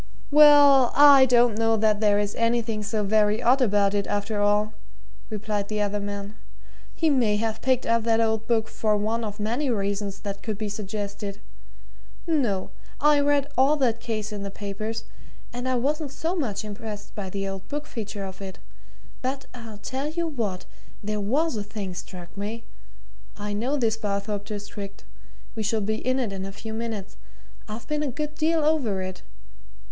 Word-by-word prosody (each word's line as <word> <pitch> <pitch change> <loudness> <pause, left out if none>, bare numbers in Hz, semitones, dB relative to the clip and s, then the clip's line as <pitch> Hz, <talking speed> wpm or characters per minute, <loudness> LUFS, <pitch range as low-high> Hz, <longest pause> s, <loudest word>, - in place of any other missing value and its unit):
"Well, 285 -3 +8
I 280 -2 +9
don't 240 -3 +4
know 225 0 +3
that 215 -1 +2
there 210 -1 +4
is 205 0 0
anything 230 -2 0
so 210 0 -1
very 210 +1 +3
odd 250 +3 +4
about 205 -4 +3
it, 200 -1 0
after 205 +1 -1
all," 210 +1 +2 0.6
replied 210 -1 -2
the 215 0 -2
other 205 0 0
man. 200 +1 -5 0.6
"He 320 -2 +2
may 235 -7 +3
have 220 +1 -2
picked 260 -1 +2
up 230 0 +3
that 225 -1 +3
old 220 -1 +1
book 225 -2 +2
for 215 -1 +1
one 220 +3 -1
of 210 -1 -5
many 240 +7 0
reasons 200 -2 -2
that 200 -1 -5
could 215 -2 -3
be 215 -1 -3
suggested. 205 -1 -5 0.9
No 250 - 0 0.3
I 295 0 +5
read 285 -1 +2
all 270 +3 +5
that 245 -6 +1
case 220 -2 -3
in 205 -1 -5
the 200 - -4
papers, 205 +3 -5 0.5
and 245 +1 -3
I 255 - +2
wasn't 285 +3 -1
so 330 +5 -2
much 220 - -2
impressed 210 0 -7
by 195 -3 -5
the 195 +1 -3
old 195 0 -6
book 295 +1 -4
feature 215 -6 -5
of 190 0 -9
it. 190 -1 -7 0.6
But 265 +2 -3
I'll 230 -4 -9
tell 265 +7 -4
you 340 +2 -2
what 225 - -3 0.4
there 210 0 -2
was 275 +8 +1
a 205 - -2
thing 205 -3 -5
struck 180 0 -9
me. 215 +3 -5 0.7
I 205 0 -4
know 245 +8 0
this 225 -4 +1
Barthorpe 205 -1 -2
district 205 -1 -7 0.5
we 225 - -4
shall 220 +1 +1
be 215 +1 -1
in 255 +3 0
it 235 -6 -1
in 190 -1 -4
a 195 - -5
few 220 +2 -7
minutes 220 -3 -5 0.5
I've 215 +1 -7
been 300 0 -1
a 300 - 0
good 300 +3 -3
deal 315 0 +1
over 245 -12 +1
it. 185 0 -6
220 Hz, 180 wpm, -25 LUFS, 205-250 Hz, 0.9 s, I